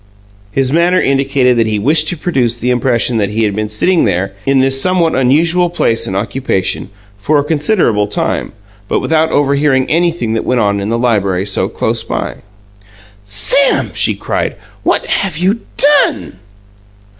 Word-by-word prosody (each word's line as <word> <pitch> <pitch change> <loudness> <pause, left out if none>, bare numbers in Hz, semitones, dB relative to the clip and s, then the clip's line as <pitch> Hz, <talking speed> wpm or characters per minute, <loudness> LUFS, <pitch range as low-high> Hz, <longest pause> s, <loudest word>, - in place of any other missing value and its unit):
His 135 +3 0
manner 175 +2 +3
indicated 135 -3 +1
that 115 -1 +2
he 110 -1 -1
wished 150 +9 +1
to 175 - -2
produce 130 -8 -1
the 125 +1 -1
impression 120 -1 +1
that 100 -2 0
he 110 +2 -1
had 105 -2 -1
been 105 0 -3
sitting 165 +12 +1
there, 95 +3 -1
in 135 0 +3
this 135 0 +2
somewhat 180 -2 +1
unusual 165 +7 +2
place 115 -9 0
and 95 - -4
occupation, 100 -2 -2 0.3
for 145 +9 +1
a 145 - +1
considerable 150 - +1
time, 105 - -2 0.4
but - - 0
without 160 0 0
overhearing 140 -2 +1
anything 165 -8 0
that 115 - -1
went 125 -1 0
on 100 -2 +1
in 100 +1 -3
the 115 - 0
library 100 -6 0
so 100 - -1
close - - -2
by. - - -4 0.9
"Sam," 100 - +2
she - - +1
cried, - - -3 0.3
"what - - 0
have 195 -6 -1
you 190 +6 0 0.2
DONE?" 285 - +2
130 Hz, 165 wpm, -13 LUFS, 110-160 Hz, 0.9 s, manner